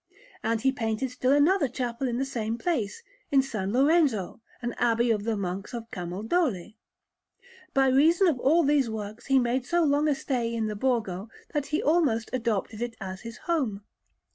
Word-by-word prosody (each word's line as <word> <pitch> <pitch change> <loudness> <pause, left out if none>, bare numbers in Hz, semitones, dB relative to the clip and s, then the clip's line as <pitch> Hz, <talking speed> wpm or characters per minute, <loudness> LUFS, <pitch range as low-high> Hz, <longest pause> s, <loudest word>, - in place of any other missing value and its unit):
And 225 0 0
he 265 +2 +3
painted 230 +1 -2
still 255 +1 0
another 290 +3 +4
chapel 245 +1 -3
in 240 -1 -1
the 270 - 0
same 230 -4 -3
place, 305 - -2 0.3
in 275 -1 +5
S. 270 - -8
Lorenzo, 235 - +2 0.2
an 240 -1 -3
abbey 235 0 +2
of 210 -2 -1
the 225 -2 0
Monks 195 +3 -4
of 230 -1 -7
Camaldoli. 205 - -2 1.0
By 270 0 +5
reason 315 +8 +4
of 315 -8 +2
all 320 +7 +4
these 285 -4 +2
works 215 0 -6
he 270 -1 +4
made 250 0 +1
so 345 +6 +1
long 290 0 +2
a 295 - +2
stay 240 -4 -2
in 225 -1 -1
the 215 -1 -3
Borgo 215 -4 -1 0.2
that 295 -2 -1
he 300 - -1
almost 285 -8 +2
adopted 225 -3 -1
it 240 -1 -3
as 190 -2 -6
his 230 -1 -8
home. 255 -12 -1
240 Hz, 180 wpm, -27 LUFS, 220-280 Hz, 1.0 s, in